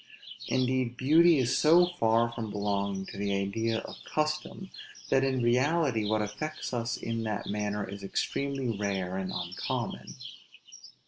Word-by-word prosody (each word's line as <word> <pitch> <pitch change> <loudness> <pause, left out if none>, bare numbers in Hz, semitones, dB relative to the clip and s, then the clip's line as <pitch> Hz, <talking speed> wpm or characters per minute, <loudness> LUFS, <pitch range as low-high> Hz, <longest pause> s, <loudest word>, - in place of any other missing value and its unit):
Indeed 130 -1 0
beauty 160 +5 +5
is 125 -2 +2
so 170 +3 +6
far 115 -9 +2
from 115 -2 -5
belonging 100 -1 -1
to 100 - -9
the 100 0 0
idea 110 +4 -1
of - - -10
custom, 155 +5 -2 0.4
that 135 0 +3
in 130 -2 +1
reality 130 -1 +2
what 110 -1 +2
affects 130 +9 -5
us 115 -1 -1
in 115 0 -3
that 105 -2 -2
manner 105 0 -2
is 100 +1 -8
extremely 135 +4 -2
rare 95 -2 -2
and 95 -1 -3
uncommon. 90 0 -4
115 Hz, 140 wpm, -29 LUFS, 100-135 Hz, 0.4 s, so